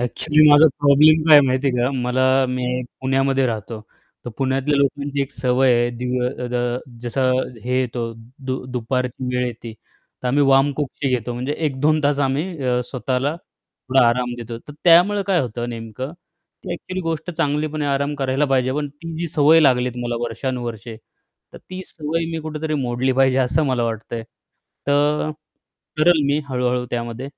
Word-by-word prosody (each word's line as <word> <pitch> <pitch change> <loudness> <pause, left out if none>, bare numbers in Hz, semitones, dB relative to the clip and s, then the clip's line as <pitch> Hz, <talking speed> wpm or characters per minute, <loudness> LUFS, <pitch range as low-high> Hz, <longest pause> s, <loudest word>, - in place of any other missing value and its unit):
Actually, 150 +5 +3
माझा 145 +2 +8
problem 150 +2 +5
काय 150 -2 +9
माहिती 130 0 0
आहे 125 - -1
का? 125 - +1
मला 125 +1 +1 0.2
मी 125 0 -2 0.4
पुण्यामध्ये 135 0 +1
राहतो, 110 -1 -4 0.4
तर 120 - -5
पुण्यातल्या 135 +2 0
लोकांची 140 0 -1
एक 135 - -6
सवय 130 0 +2
आहे. 120 0 +1
दिन 125 +1 -2 0.3
द 120 0 -1 0.2
जसं 130 +2 0 0.3
हे 125 +1 0
येतो, 120 -2 -3 0.3
दु 130 -1 -4
दुपारची 125 +1 -2
वेळ 125 0 0
येते, 115 -1 -7 0.5
तर 125 - -1
आम्ही 145 +3 +2
वामकुक्षी 135 0 +1
घेतो. 120 0 -3
म्हणजे 125 +4 -3
1-2 150 +2 +1
तास 145 0 +2
आम्ही 140 +6 -1 0.2
अ, 125 -1 +1
स्वतःला 130 +3 -1
थोडा 130 -6 -1
आराम 125 +1 -1
देतो. 115 0 -7
तर 145 - -13
त्यामुळे 180 +4 +5
काय 190 -3 +2
होतं 120 -2 -4
नेमकं, 115 +4 -6 0.5
की 185 - -7
ॲक्च्युअली 185 +2 -5
गोष्ट 165 0 -3
चांगलीपण 155 -2 -1
आहे 145 - 0
आराम 140 +1 -1
करायला 135 0 0
पाहिजे 130 -2 +1
पण, 145 +1 -2
ती 160 +4 -9
जी 170 +1 -3
सवय 155 +2 +5
लागलीत 125 -4 +3
मला 120 0 -2
वर्षानुवर्षे, 120 -1 -5 0.6
तर - - -11
ती 185 0 -9
सवय 160 +2 -3
मी 165 - -3
कुठेतरी 155 0 -4
मोडली 125 +1 0
पाहिजे, 130 0 +3
असं 135 +4 +1
मला 130 -3 0
वाटतंय. 115 0 -4 0.6
तर 145 +2 +1 0.7
करेल 160 0 +4
मी 145 +2 +1
हळू-हळू 125 -1 -1
त्यामध्ये. 120 +1 -4
130 Hz, 160 wpm, -21 LUFS, 125-150 Hz, 0.7 s, काय